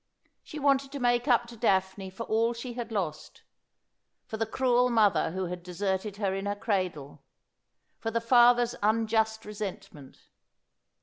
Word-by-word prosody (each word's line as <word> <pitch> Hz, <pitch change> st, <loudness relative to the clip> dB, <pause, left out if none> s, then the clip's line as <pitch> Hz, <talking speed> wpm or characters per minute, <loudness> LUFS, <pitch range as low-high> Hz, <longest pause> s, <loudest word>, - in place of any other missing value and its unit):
She 310 Hz, -, -10 dB
wanted 275 Hz, -1 st, +1 dB
to 280 Hz, -, -4 dB
make 240 Hz, +1 st, +1 dB
up 240 Hz, -2 st, +3 dB
to 240 Hz, -, -10 dB
Daphne 190 Hz, -3 st, 0 dB
for 190 Hz, +5 st, -7 dB
all 230 Hz, +1 st, +1 dB
she 240 Hz, +1 st, -7 dB
had 235 Hz, -1 st, -6 dB
lost; 175 Hz, -8 st, -4 dB, 0.8 s
for 220 Hz, -, -6 dB
the 225 Hz, 0 st, -1 dB
cruel 250 Hz, +1 st, +2 dB
mother 220 Hz, -4 st, +3 dB
who 185 Hz, +3 st, -3 dB
had 180 Hz, 0 st, -6 dB
deserted 190 Hz, +3 st, -3 dB
her 200 Hz, -2 st, -1 dB
in 195 Hz, +1 st, -3 dB
her 205 Hz, -, -1 dB
cradle; 185 Hz, -9 st, -3 dB, 0.8 s
for 225 Hz, -, -3 dB
the 230 Hz, +1 st, 0 dB
father's 240 Hz, 0 st, +4 dB
unjust 220 Hz, +1 st, +1 dB
resentment. 200 Hz, -9 st, -8 dB
220 Hz, 150 wpm, -28 LUFS, 190-240 Hz, 0.8 s, father's